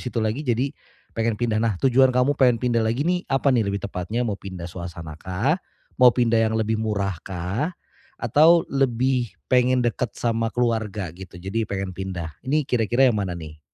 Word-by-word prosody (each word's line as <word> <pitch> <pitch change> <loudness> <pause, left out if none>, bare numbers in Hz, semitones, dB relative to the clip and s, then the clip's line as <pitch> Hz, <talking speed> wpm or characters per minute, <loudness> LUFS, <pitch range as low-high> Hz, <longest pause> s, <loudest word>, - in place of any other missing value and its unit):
situ 120 - -3
lagi 110 +6 -1
jadi 130 0 0 0.4
pengen 115 -1 0
pindah. 110 -1 0
Nah 115 -4 +1
tujuan 130 0 +5
kamu 125 +2 +2
pengen 130 -4 +3
pindah 120 -1 +1
lagi 115 +5 0
nih 180 +1 -1
apa 135 0 +2
nih 115 -5 +2
lebih 100 0 -3
tepatnya, 100 +6 -2
mau 105 -4 -3
pindah 95 -3 -7
suasana 85 -2 -8
kah? 110 - 0 0.4
Mau 125 - +9
pindah 115 -2 +2
yang 110 0 +1
lebih 110 0 0
murah 100 -5 -2
kah? 100 - -3 0.4
Atau 155 +8 +5
lebih 130 -2 +1 0.2
pengen 125 0 +4
dekat 120 0 -2
sama 115 -1 0
keluarga 110 -7 -1
gitu 90 0 -11
jadi 95 +5 -3
pengen 95 -1 -3
pindah? 90 -3 -5
Ini 150 +3 0
kira-kira 120 0 +2
yang 105 - -1
mana 90 -3 -3
nih? 80 -2 -10
115 Hz, 180 wpm, -23 LUFS, 95-125 Hz, 0.4 s, Mau